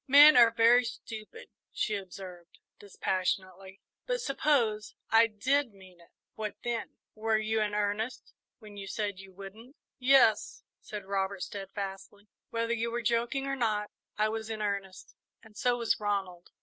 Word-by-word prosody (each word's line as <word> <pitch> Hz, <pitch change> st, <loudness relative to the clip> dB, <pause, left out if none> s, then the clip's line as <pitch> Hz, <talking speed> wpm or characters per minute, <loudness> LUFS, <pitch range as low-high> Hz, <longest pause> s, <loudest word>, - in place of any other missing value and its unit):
"Men 290 Hz, +3 st, +9 dB
are 235 Hz, -2 st, +8 dB
very 230 Hz, +2 st, +5 dB
stupid," 225 Hz, -, -8 dB, 0.2 s
she 215 Hz, -, -1 dB
observed, 185 Hz, -3 st, -9 dB, 0.2 s
dispassionately; 190 Hz, 0 st, -3 dB, 0.3 s
"but -, -, 0 dB
suppose 250 Hz, -, 0 dB, 0.2 s
I 225 Hz, +1 st, +6 dB
did 245 Hz, +3 st, 0 dB
mean 185 Hz, -2 st, -16 dB
it 170 Hz, -, -20 dB, 0.2 s
what 215 Hz, -1 st, -5 dB
then? 235 Hz, -1 st, -3 dB, 0.2 s
Were 220 Hz, 0 st, +1 dB
you 220 Hz, 0 st, 0 dB
in 210 Hz, -1 st, -1 dB
earnest 210 Hz, +3 st, -2 dB, 0.2 s
when 210 Hz, -3 st, -13 dB
you 195 Hz, -1 st, -7 dB
said 200 Hz, -1 st, -3 dB
you 195 Hz, 0 st, -12 dB
wouldn't?" 205 Hz, +8 st, -12 dB, 0.2 s
"Yes," 250 Hz, -5 st, +4 dB, 0.2 s
said 210 Hz, -2 st, -8 dB
Robert, 195 Hz, -1 st, -2 dB
steadfastly; 200 Hz, +1 st, -7 dB, 0.2 s
"whether 230 Hz, 0 st, -1 dB
you 230 Hz, 0 st, -1 dB
were 235 Hz, 0 st, -3 dB
joking 235 Hz, +4 st, 0 dB
or 275 Hz, 0 st, -1 dB
not, 215 Hz, -4 st, -1 dB, 0.3 s
I 215 Hz, +1 st, +3 dB
was 220 Hz, 0 st, -4 dB
in 220 Hz, -1 st, -4 dB
earnest, 200 Hz, -2 st, -4 dB, 0.3 s
and 220 Hz, -2 st, -17 dB
so 245 Hz, +2 st, +1 dB
was 235 Hz, -2 st, 0 dB
Ronald." 195 Hz, -4 st, -3 dB
215 Hz, 150 wpm, -30 LUFS, 195-235 Hz, 0.3 s, Men